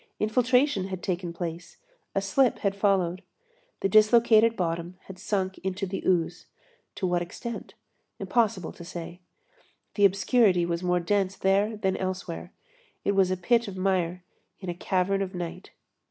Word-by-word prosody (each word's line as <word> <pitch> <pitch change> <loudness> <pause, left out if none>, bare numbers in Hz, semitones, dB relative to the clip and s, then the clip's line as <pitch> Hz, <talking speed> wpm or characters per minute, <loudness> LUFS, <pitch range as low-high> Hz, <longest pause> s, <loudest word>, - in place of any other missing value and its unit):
Infiltration 250 -1 +2
had 185 -2 -6
taken 180 -2 -2
place, 170 0 -6 0.4
a 195 - +1
slip 245 +6 +2
had 200 0 +2
followed. 190 -3 +1 0.6
The - - +2
dislocated 220 +2 +5
bottom 170 0 -2
had 190 -1 -11
sunk 190 -2 -2
into 190 +1 -3
the 195 +1 -4
ooze. 175 -2 0 0.5
To 200 - -2
what 175 -1 +1
extent? 225 +6 -7 0.4
Impossible 210 -7 0
to - - -11
say. 170 0 -8 0.7
The 205 - +4
obscurity 195 -2 +3
was 170 0 -2
more 180 -1 +1
dense 195 +2 0
there 200 +3 +1
than 190 -2 0
elsewhere. 185 -2 -4 0.5
It - - +2
was 195 -2 +3
a 185 - 0
pit 235 +6 +2
of 195 -2 -7
mire 180 -2 0 0.4
in 185 - -6
a - - -1
cavern 190 +2 0
of 190 -1 -4
night. 175 +1 -6
190 Hz, 155 wpm, -27 LUFS, 180-205 Hz, 0.7 s, dislocated